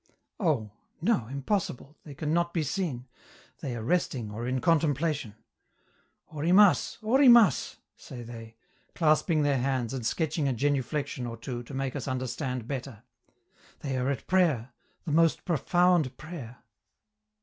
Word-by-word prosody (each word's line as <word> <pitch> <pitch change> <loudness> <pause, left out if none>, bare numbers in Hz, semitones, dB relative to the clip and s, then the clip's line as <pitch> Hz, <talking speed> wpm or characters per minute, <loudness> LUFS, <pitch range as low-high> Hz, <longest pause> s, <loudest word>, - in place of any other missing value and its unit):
Oh! 140 - 0 0.3
no, 165 - +1
impossible, 140 - -3
they 145 -3 -10
can 150 +1 -2
not 170 +1 0
be 165 - +1
seen; 145 -6 -3 0.5
they 125 -3 -4
are 115 - -5
resting 125 -7 -1
or 115 +3 -5
are - - -3
in 130 +1 0
contemplation. 150 - +1 1.0
"Orimas! 180 +6 +4
Orimas!" 235 - +5 0.2
say 120 -2 -10
they, 115 -1 -10 0.4
clasping 155 0 +2
their 140 -2 +2
hands 130 -2 -1
and 130 -3 -4
sketching 155 +4 0
a 135 - +1
genuflection 140 0 -1
or 115 0 -6
two 120 +1 -5
to 120 +3 -9
make 135 0 -2
us 140 - -4
understand 130 -1 -3
better. 130 -5 -6 0.8
("They 135 -2 -3
are 130 +1 0
at 140 - -3
prayer! 155 -10 +2 0.3
the 160 - -3
most 165 +1 +3
profound 175 -3 +2
prayer!") 145 -7 -9
140 Hz, 140 wpm, -28 LUFS, 125-165 Hz, 1.0 s, Orimas